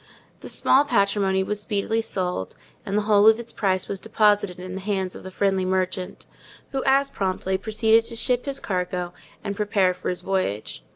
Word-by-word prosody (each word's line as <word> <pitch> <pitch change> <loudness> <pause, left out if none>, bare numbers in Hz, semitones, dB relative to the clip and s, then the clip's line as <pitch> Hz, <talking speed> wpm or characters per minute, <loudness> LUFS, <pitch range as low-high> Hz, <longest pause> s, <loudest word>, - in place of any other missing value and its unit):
The - - -9
small 275 - +4
patrimony 200 -6 +1
was 210 +1 -3
speedily 210 +2 -1
sold, 180 - -3 0.3
and 200 +1 0
the 210 - +1
whole 210 0 +5
of 220 0 +7
its 235 0 -6
price 190 -2 0
was 195 - -3
deposited 205 -4 +2
in 185 0 -7
the 190 - -5
hands 190 -2 -2
of - - -10
the 190 - -8
friendly 195 0 0
merchant; 185 0 -2 0.5
who 270 -1 -2
as 275 +1 +3
promptly 190 -2 -1
proceeded 220 +3 +2
to 230 - -4
ship 245 +2 0
his 275 -1 -3
cargo, 180 -2 -3 0.3
and 200 -2 -3
prepare 200 -3 +2
for 180 - -5
his 180 - -3
voyage. 110 - -2
200 Hz, 185 wpm, -24 LUFS, 185-220 Hz, 0.5 s, of